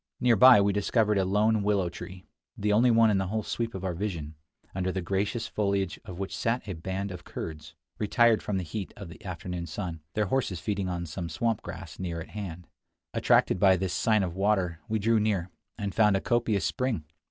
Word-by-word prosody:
Near 120 Hz, -2 st, +4 dB
by 125 Hz, +2 st, +9 dB
we 100 Hz, 0 st, +2 dB
discovered 105 Hz, 0 st, +2 dB
a 95 Hz, -, +2 dB
lone 105 Hz, +3 st, +2 dB
willow 100 Hz, -3 st, +1 dB
tree, 90 Hz, +1 st, -9 dB, 0.3 s
the 105 Hz, 0 st, +1 dB
only 120 Hz, +4 st, +5 dB
one 115 Hz, -1 st, +5 dB
in 100 Hz, -, +2 dB
the 95 Hz, -, -1 dB
whole 110 Hz, +3 st, -2 dB
sweep 115 Hz, 0 st, -3 dB
of 95 Hz, 0 st, -5 dB
our 90 Hz, -, -1 dB
vision, 85 Hz, -5 st, -4 dB, 0.4 s
under 95 Hz, 0 st, -1 dB
the 95 Hz, -, -2 dB
gracious 100 Hz, +6 st, -1 dB
foliage 100 Hz, -3 st, -1 dB
of 90 Hz, -, -9 dB
which 95 Hz, 0 st, -4 dB
sat 115 Hz, 0 st, -1 dB
a 95 Hz, -, -3 dB
band 95 Hz, +4 st, -4 dB
of 90 Hz, -1 st, -8 dB
Kurds, 75 Hz, -1 st, -7 dB, 0.2 s
retired 115 Hz, +1 st, +4 dB
from 100 Hz, -, -2 dB
the 95 Hz, -, -2 dB
heat 95 Hz, +4 st, -5 dB
of 100 Hz, -4 st, -8 dB
the 85 Hz, -, -13 dB
afternoon 90 Hz, -2 st, -5 dB
sun, 85 Hz, -5 st, -5 dB
their 105 Hz, -, +2 dB
horses 100 Hz, -5 st, -1 dB
feeding 100 Hz, +2 st, -2 dB
on 85 Hz, -1 st, -3 dB
some 85 Hz, +1 st, -5 dB
swamp 110 Hz, +7 st, -1 dB
grass 85 Hz, -5 st, -8 dB
near 85 Hz, -2 st, -3 dB
at 80 Hz, -, -8 dB
hand. 90 Hz, -5 st, -7 dB, 0.5 s
Attracted -, -, +3 dB
by 95 Hz, -1 st, +5 dB
this 95 Hz, 0 st, -2 dB
sign 110 Hz, -3 st, +2 dB
of 90 Hz, -2 st, -3 dB
water, 95 Hz, -4 st, +1 dB
we 110 Hz, -, +1 dB
drew 110 Hz, +2 st, +3 dB
near, 100 Hz, -4 st, 0 dB, 0.3 s
and 100 Hz, -3 st, -3 dB
found 105 Hz, -2 st, +4 dB
a -, -, 0 dB
copious 115 Hz, -5 st, +1 dB
spring. 125 Hz, -, -1 dB
100 Hz, 210 wpm, -28 LUFS, 90-105 Hz, 0.5 s, by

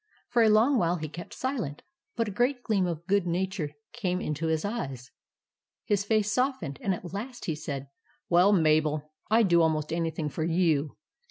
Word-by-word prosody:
For 240 Hz, -1 st, +3 dB
a 225 Hz, -, +6 dB
long 230 Hz, +5 st, +4 dB
while 175 Hz, -1 st, +2 dB
he 155 Hz, -3 st, -4 dB
kept 170 Hz, +3 st, -9 dB
silent; 225 Hz, -, -3 dB, 0.3 s
but 230 Hz, -2 st, 0 dB
a -, -, -3 dB
great 245 Hz, +5 st, 0 dB
gleam 200 Hz, -5 st, +1 dB
of 170 Hz, -1 st, -4 dB
good 195 Hz, -1 st, +2 dB
nature 180 Hz, -2 st, -1 dB, 0.2 s
came 185 Hz, -6 st, -1 dB
into 155 Hz, -1 st, -2 dB
his 160 Hz, +1 st, 0 dB
eyes. 135 Hz, -, -4 dB, 0.7 s
His 200 Hz, -1 st, +1 dB
face 210 Hz, 0 st, +1 dB
softened, 250 Hz, -, -1 dB
and 195 Hz, -2 st, +1 dB
at 175 Hz, 0 st, -9 dB
last 240 Hz, +5 st, -6 dB
he 165 Hz, -, 0 dB
said 140 Hz, -3 st, -5 dB, 0.2 s
— -, -, -37 dB
"WELL, 180 Hz, +3 st, +5 dB
MABEL, 155 Hz, -4 st, +3 dB, 0.3 s
I 225 Hz, +2 st, +5 dB
'D 195 Hz, -, +1 dB
DO 170 Hz, -1 st, +5 dB
ALMOST 155 Hz, -1 st, +1 dB
ANYTHING 165 Hz, -2 st, -1 dB
FOR 160 Hz, -, -3 dB
YOU. 160 Hz, -3 st, +1 dB
175 Hz, 190 wpm, -28 LUFS, 155-215 Hz, 0.7 s, a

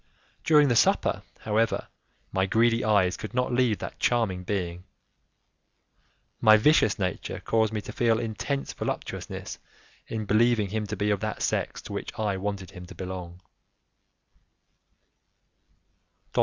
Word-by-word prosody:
During 150 Hz, -2 st, +5 dB
the 120 Hz, -, +2 dB
supper, -, -, +3 dB, 0.2 s
however, 110 Hz, +1 st, 0 dB, 0.4 s
my 95 Hz, 0 st, +1 dB
greedy 115 Hz, +3 st, +3 dB
eyes 100 Hz, -4 st, +3 dB
could 110 Hz, +3 st, -7 dB
not 125 Hz, 0 st, +1 dB
leave 120 Hz, -4 st, +2 dB
that -, -, -7 dB
charming 110 Hz, -7 st, +1 dB
being; 90 Hz, -2 st, -3 dB, 1.6 s
my 110 Hz, 0 st, +7 dB
vicious 110 Hz, -3 st, +4 dB
nature 90 Hz, -3 st, -3 dB
caused 110 Hz, -1 st, +1 dB
me 105 Hz, -1 st, -2 dB
to 105 Hz, -, -8 dB
feel 115 Hz, 0 st, +2 dB
intense 120 Hz, +5 st, -3 dB
voluptuousness -, -, -5 dB, 0.5 s
in 110 Hz, -1 st, -4 dB
believing 110 Hz, 0 st, +3 dB
him 105 Hz, +1 st, -2 dB
to -, -, -3 dB
be 105 Hz, 0 st, 0 dB
of 100 Hz, -, +1 dB
that -, -, -3 dB
sex -, -, -1 dB
to -, -, -8 dB
which -, -, -5 dB
I 105 Hz, -3 st, 0 dB
wanted 100 Hz, -1 st, -4 dB
him 90 Hz, 0 st, -10 dB
to -, -, -11 dB
belong. 90 Hz, -1 st, -7 dB
105 Hz, 135 wpm, -27 LUFS, 95-115 Hz, 1.6 s, my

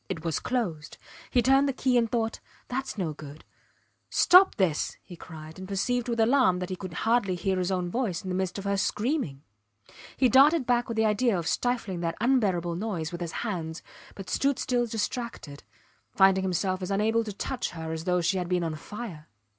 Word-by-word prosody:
It 165 Hz, 0 st, -5 dB
was 165 Hz, -3 st, 0 dB
closed. 180 Hz, -12 st, -3 dB, 0.3 s
He 245 Hz, -, +2 dB
turned 270 Hz, +2 st, +4 dB
the -, -, -1 dB
key 255 Hz, 0 st, +1 dB
and 235 Hz, -2 st, +3 dB
thought: 225 Hz, -2 st, -1 dB, 0.3 s
thats 265 Hz, -1 st, -3 dB
no 170 Hz, -6 st, -2 dB
good.... 150 Hz, 0 st, -11 dB, 0.6 s
Stop 370 Hz, +2 st, +6 dB
this! 180 Hz, -7 st, 0 dB
he 180 Hz, -, -11 dB
cried, 160 Hz, 0 st, -11 dB
and 190 Hz, -, -7 dB
perceived 245 Hz, +5 st, -1 dB
with 230 Hz, -1 st, -1 dB
alarm 225 Hz, -5 st, +4 dB
that 180 Hz, 0 st, -4 dB
he -, -, -1 dB
could 185 Hz, -2 st, -8 dB
hardly 225 Hz, -5 st, +2 dB
hear 190 Hz, +1 st, -1 dB
his 180 Hz, +1 st, -1 dB
own 180 Hz, -2 st, -1 dB
voice 210 Hz, -8 st, -2 dB
in 190 Hz, -, -5 dB
the 180 Hz, -, -1 dB
midst 190 Hz, 0 st, -2 dB
of 200 Hz, -, -5 dB
her 200 Hz, 0 st, 0 dB
screaming. 210 Hz, -, -1 dB, 0.7 s
He 260 Hz, -, +4 dB
darted 275 Hz, +4 st, +5 dB
back 240 Hz, 0 st, +1 dB
with 230 Hz, -, -4 dB
the 220 Hz, -, +3 dB
idea 215 Hz, 0 st, +2 dB
of 165 Hz, -2 st, -3 dB
stifling 230 Hz, -7 st, -1 dB
that 165 Hz, -1 st, -2 dB
unbearable 200 Hz, -9 st, +1 dB
noise 185 Hz, -6 st, -3 dB
with 175 Hz, 0 st, -6 dB
his 170 Hz, -1 st, -3 dB
hands, 165 Hz, -6 st, -4 dB, 0.3 s
but 195 Hz, -2 st, -8 dB
stood 275 Hz, +8 st, +1 dB
still 245 Hz, -1 st, 0 dB
distracted, 225 Hz, -, -4 dB, 0.5 s
finding 190 Hz, -1 st, +5 dB
himself 185 Hz, 0 st, -1 dB
as 185 Hz, -, -4 dB
unable 220 Hz, +3 st, +2 dB
to 215 Hz, -, -5 dB
touch 250 Hz, +5 st, -3 dB
her 160 Hz, -1 st, -6 dB
as 160 Hz, 0 st, -5 dB
though 180 Hz, -1 st, +2 dB
she 185 Hz, +3 st, +1 dB
had 175 Hz, -1 st, -4 dB
been 180 Hz, -1 st, +1 dB
on 165 Hz, -1 st, -2 dB
fire. 170 Hz, -1 st, -8 dB
195 Hz, 200 wpm, -27 LUFS, 175-240 Hz, 0.7 s, Stop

